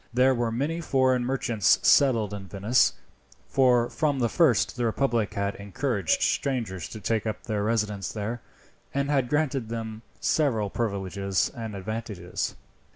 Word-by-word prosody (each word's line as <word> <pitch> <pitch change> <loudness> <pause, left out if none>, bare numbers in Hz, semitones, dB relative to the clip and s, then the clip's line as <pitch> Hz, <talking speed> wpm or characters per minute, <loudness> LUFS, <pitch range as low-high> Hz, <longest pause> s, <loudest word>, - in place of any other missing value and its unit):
There 130 +2 +4
were 120 -2 -1
many 145 +8 -1
foreign 130 -4 +2
merchants 120 -5 +2
settled 115 -8 +4
in 100 -2 -7
Venice, 100 +6 +2 0.5
for 125 -3 +3
from 145 0 0
the 120 -3 +1
first 140 - +3
the 125 - -2
republic 115 -2 0
had 100 0 -1
encouraged 100 - -1
strangers 115 -10 -1
to 110 - -8
take 110 +1 -1
up 110 - -4
their 105 -3 -2
residence 105 -3 -1
there, 110 +2 -4 0.5
and 140 +1 0
had 135 -4 +1
granted 140 -5 0
them 110 -1 -5 0.2
several 115 -10 +1
privileges 100 -3 -1
and 110 -3 -5
advantages. 100 -3 -4
115 Hz, 145 wpm, -26 LUFS, 105-130 Hz, 0.5 s, There